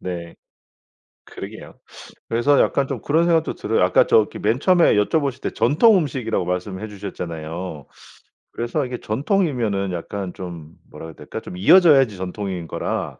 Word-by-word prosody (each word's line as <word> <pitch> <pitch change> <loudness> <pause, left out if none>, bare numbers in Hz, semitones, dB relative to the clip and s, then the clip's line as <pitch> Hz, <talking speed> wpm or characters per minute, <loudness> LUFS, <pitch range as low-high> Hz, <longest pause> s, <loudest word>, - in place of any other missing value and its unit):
네. 85 -2 -6 0.9
그러게요. - - -10 0.5
그래서 125 +5 +2
약간 140 -1 +2
좀 - - -5
그런 160 +3 +2
생각도 165 -2 +1
들어요. - - 0
아까 - - +4
저기 110 - +2
맨 110 +5 0
처음에 175 - +4
여쭤보실 135 +5 0
때 - - -2
전통 155 - +4
음식이라고 125 - -1
말씀해 95 +3 -4
주셨잖아요. 85 -5 -7 0.7
그래서 120 +4 -2
이게 125 -1 -6
전통이면은 120 - -1
약간 90 +2 -5
좀 85 -4 -9 0.2
뭐라 80 - -9
그래야 80 - -11
될까? - - -8
좀 90 - -9
이어져야지 135 - +5
전통인 95 -2 -5
거라. - - -4
110 Hz, 355 characters per minute, -21 LUFS, 90-140 Hz, 0.9 s, 이어져야지